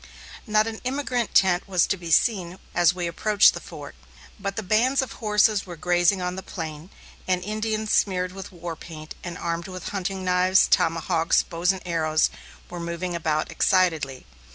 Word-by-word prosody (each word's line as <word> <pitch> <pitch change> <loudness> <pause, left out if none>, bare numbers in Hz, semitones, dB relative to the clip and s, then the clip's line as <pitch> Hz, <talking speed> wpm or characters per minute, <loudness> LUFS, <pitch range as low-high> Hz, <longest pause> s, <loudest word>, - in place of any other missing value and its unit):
Not 215 0 +3
an 225 -1 -6
emigrant 255 -3 -2
tent 185 -1 +4
was 185 -3 +3
to - - 0
be 175 -3 -8
seen 185 -1 +2 0.2
as 175 0 +3
we 180 -1 -3
approached 205 +5 +4
the - - -6
fort, - - -10 0.5
but 200 0 -4
bands 255 +7 +3
of 260 - -7
horses 210 -1 +2
were 175 - -7
grazing 175 +3 +2
on 180 0 -2
the 190 - -5
plain, 160 -2 -7 0.4
and 180 -1 0
Indians 215 +1 -2
smeared 185 -2 +1
with 190 +1 -9
war 170 -2 -6
paint, 155 -1 -10
and 175 -1 -6
armed 170 +2 -3
with 185 -2 -6
hunting 190 -1 -3
knives, 185 +1 +4
tomahawks, 165 0 +2
bows 170 +2 0
and 190 -1 -6
arrows, 160 -2 +1 0.4
were 175 - -7
moving 170 +1 -4
about 155 -2 -1
excitedly. 160 -8 +1
180 Hz, 170 wpm, -24 LUFS, 170-200 Hz, 0.5 s, tent